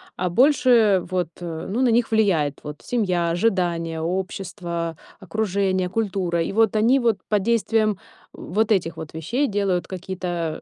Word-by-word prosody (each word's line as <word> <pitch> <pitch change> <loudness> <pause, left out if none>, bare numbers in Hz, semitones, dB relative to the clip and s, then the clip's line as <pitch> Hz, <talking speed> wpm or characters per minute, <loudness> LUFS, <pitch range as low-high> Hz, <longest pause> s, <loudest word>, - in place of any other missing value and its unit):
а 180 0 -1
больше 240 - +4
вот, 180 -1 0
э 165 -2 -5
ну 225 +6 -1
на 255 - +4
них 230 0 +2
влияет 170 -10 +1
вот 150 0 -8
семья, 185 -8 0
ожидания, 170 -4 0
общество, 175 -1 -3 0.2
окружение, 190 -1 -1
культура. 185 -4 -1
И 165 - -2
вот 220 0 +3
они 240 +6 +4
вот 230 -4 +2
под 210 -2 +1
действием, 225 -1 +2
э, - - -5 0.4
вот 215 +5 -1
этих 170 -5 +1
вот 160 -1 -8
вещей 235 - -1
делают 200 -4 0
какие-то 175 -3 -4
190 Hz, 155 wpm, -23 LUFS, 170-220 Hz, 0.4 s, больше